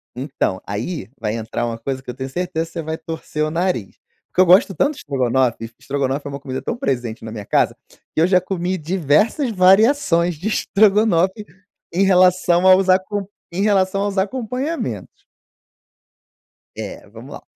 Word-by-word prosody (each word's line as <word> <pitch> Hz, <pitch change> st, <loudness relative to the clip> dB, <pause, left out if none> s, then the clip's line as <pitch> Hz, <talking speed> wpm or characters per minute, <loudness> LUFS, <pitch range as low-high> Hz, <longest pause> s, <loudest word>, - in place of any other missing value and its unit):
Então, 130 Hz, -7 st, -2 dB
aí, 105 Hz, -, -4 dB
vai 105 Hz, -, -2 dB
entrar 115 Hz, +1 st, -3 dB
uma 115 Hz, -1 st, -3 dB
coisa 130 Hz, +3 st, -5 dB
que -, -, -11 dB
eu -, -, -3 dB
tenho 130 Hz, +2 st, -6 dB
certeza 175 Hz, +1 st, -2 dB
que -, -, -17 dB
você 170 Hz, -, -3 dB
vai 160 Hz, 0 st, -4 dB
torcer 160 Hz, -2 st, -4 dB
o 155 Hz, -, -2 dB
nariz, 170 Hz, -, -2 dB, 0.4 s
que 185 Hz, -, +4 dB
eu -, -, +6 dB
gosto 185 Hz, +3 st, +5 dB
tanto 280 Hz, -, +2 dB
de -, -, -16 dB
estrogonofe, 130 Hz, -3 st, 0 dB
e 115 Hz, -, -6 dB
estrogonofe 140 Hz, 0 st, -2 dB
é -, -, -4 dB
uma 140 Hz, 0 st, -6 dB
comida 130 Hz, -1 st, -5 dB
tão 230 Hz, -, -3 dB
presente 120 Hz, -, -3 dB
na 110 Hz, -, -7 dB
minha 105 Hz, -2 st, -7 dB
casa, -, -, +1 dB, 0.4 s
que -, -, +1 dB
eu 165 Hz, -, +4 dB
já 185 Hz, -1 st, +4 dB
comi 185 Hz, 0 st, -2 dB
diversas 180 Hz, -, +1 dB
variações 185 Hz, -, +4 dB
de 170 Hz, +8 st, -5 dB
estrogonofe, 210 Hz, -2 st, +2 dB, 0.5 s
em 185 Hz, +3 st, +2 dB
relação 180 Hz, -1 st, +4 dB
aos 190 Hz, 0 st, +6 dB
acom 195 Hz, +2 st, +1 dB, 0.3 s
em 185 Hz, -, -1 dB
relação 195 Hz, -2 st, +2 dB
aos 205 Hz, -1 st, -3 dB
acompanhamentos. 250 Hz, +9 st, -2 dB, 1.7 s
É, -, -, -7 dB
vamos -, -, -11 dB
lá. -, -, -9 dB
175 Hz, 175 wpm, -20 LUFS, 135-195 Hz, 1.7 s, eu